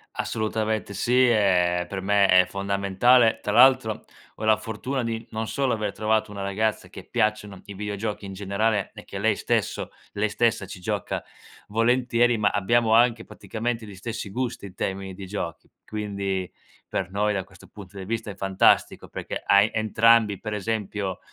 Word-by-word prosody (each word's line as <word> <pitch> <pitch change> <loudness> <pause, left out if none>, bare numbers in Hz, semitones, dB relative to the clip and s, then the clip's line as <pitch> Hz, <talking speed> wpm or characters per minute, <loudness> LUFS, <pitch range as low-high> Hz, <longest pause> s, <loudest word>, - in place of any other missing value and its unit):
Assolutamente 110 -1 -2
sì. 125 +5 +3
E 90 -5 +3
per 95 -1 -5
me 100 +1 +3
è 90 -1 +6
fondamentale, 100 +5 +3
tra 105 - -2
l'altro 130 -1 +5 0.4
ho 110 - -6
la 110 -1 +5
fortuna 125 +3 -4
di 115 0 -3
non 110 0 -3
solo 135 -3 0
aver 105 -2 -2
trovato 110 -1 0
una 100 -1 -6
ragazza 105 +2 -1
che - - -10
piacciono 105 -3 -1
i 100 - -8
videogiochi 105 +1 -4
in 95 - -7
generale 100 +2 -1
e - - -11
che - - -8
lei - - +2
stesso - - -1 0.2
lei 105 +1 0
stessa 115 -2 +1
ci 95 - -9
gioca 90 - -3 0.5
volentieri 120 +1 +2
ma 105 -1 +3
abbiamo 110 +3 +2
anche 115 -1 +4
praticamente 115 0 -4
gli 100 - -10
stessi 110 +1 -5
gusti 125 -3 -3
in 90 - -14
termini 95 0 -3
di 95 0 -8
giochi, 90 -5 -5 0.2
quindi 100 -3 -3 0.4
per 95 - -2
noi 105 +1 +1
da 95 -2 -2
questo 95 -1 -18
punto 100 -1 -12
di 95 - -6
vista 110 -1 -3
è - - -10
fantastico 95 -1 +2
perché - - -5
hai 100 +2 +5
entrambi, 110 -1 +3
per 110 -1 -5
esempio 105 -2 -3
105 Hz, 170 wpm, -25 LUFS, 100-115 Hz, 0.5 s, è